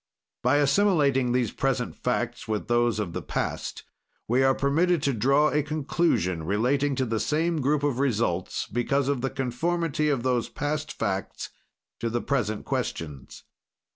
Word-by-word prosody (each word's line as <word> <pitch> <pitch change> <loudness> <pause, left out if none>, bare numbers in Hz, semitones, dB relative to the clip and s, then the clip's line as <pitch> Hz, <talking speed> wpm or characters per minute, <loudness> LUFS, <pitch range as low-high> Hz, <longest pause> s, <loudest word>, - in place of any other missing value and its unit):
"By 125 +3 +3
assimilating 145 -5 +3
these 120 -3 +1
present - - -1
facts - - -2
with 110 -1 -2
those 120 -1 +2
of 100 -6 -3
the - - -3
past, - - -3 0.4
we 125 +3 +3
are 135 0 +4
permitted 160 +3 +2
to 140 - +2
draw 135 +7 +3
a 150 - +2
conclusion, 145 - 0
relating 125 - +1
to 130 0 0
the 115 -2 -1
same 160 +3 0
group 145 +2 +1
of 140 -4 0
results, 110 -9 0
because 130 +4 0
of 140 -3 0
the 135 - 0
conformity 150 +4 -1
of 135 -5 0
those 125 -3 0
past 150 +1 -3
facts 100 -3 -3 0.5
to 115 - -1
the 120 +1 -1
present 110 -7 -1
questions. 75 -5 -4
135 Hz, 155 wpm, -26 LUFS, 115-145 Hz, 0.5 s, are